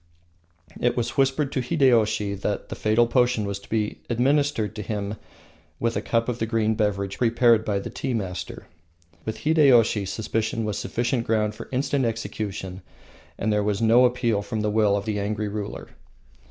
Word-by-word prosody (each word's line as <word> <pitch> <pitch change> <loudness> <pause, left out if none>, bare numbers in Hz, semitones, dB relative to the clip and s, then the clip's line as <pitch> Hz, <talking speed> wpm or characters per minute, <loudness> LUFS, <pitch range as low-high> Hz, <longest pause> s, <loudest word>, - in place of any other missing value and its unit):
It 120 0 +1
was 120 0 0
whispered 135 +1 +1
to 130 - -1
Hideyoshi 115 -8 +2
that 100 +1 -3
the - - -5
fatal 110 +2 +3
potion 120 -2 +2
was 100 0 -3
to 100 - -18
be 110 -1 -1
administered 130 -1 +1
to 105 - -4
him 105 0 -3 0.7
with 115 0 0
a - - 0
cup 115 0 0
of 120 -1 -2
the 115 - -1
green 110 -1 +1
beverage 100 -2 -1
prepared 115 -1 +4
by 105 -2 -1
the 100 - -5
tea 130 -3 -3
master. 95 -5 -5 0.6
With 110 - -4
Hideyoshi 130 -9 +4
suspicion 110 +2 -2
was 105 -1 -2
sufficient 120 0 -1
ground 105 -1 +1
for - - -10
instant 135 0 0
execution, 100 -4 -4 0.6
and 110 +1 0
there 105 0 +1
was 100 -1 0
no 115 +2 +5
appeal 120 -4 +1
from 110 +1 -3
the 105 0 0
will 105 -2 +3
of 100 - -4
the 105 -2 -1
angry 105 +1 -2
ruler. 105 0 -6
110 Hz, 175 wpm, -24 LUFS, 105-120 Hz, 0.7 s, no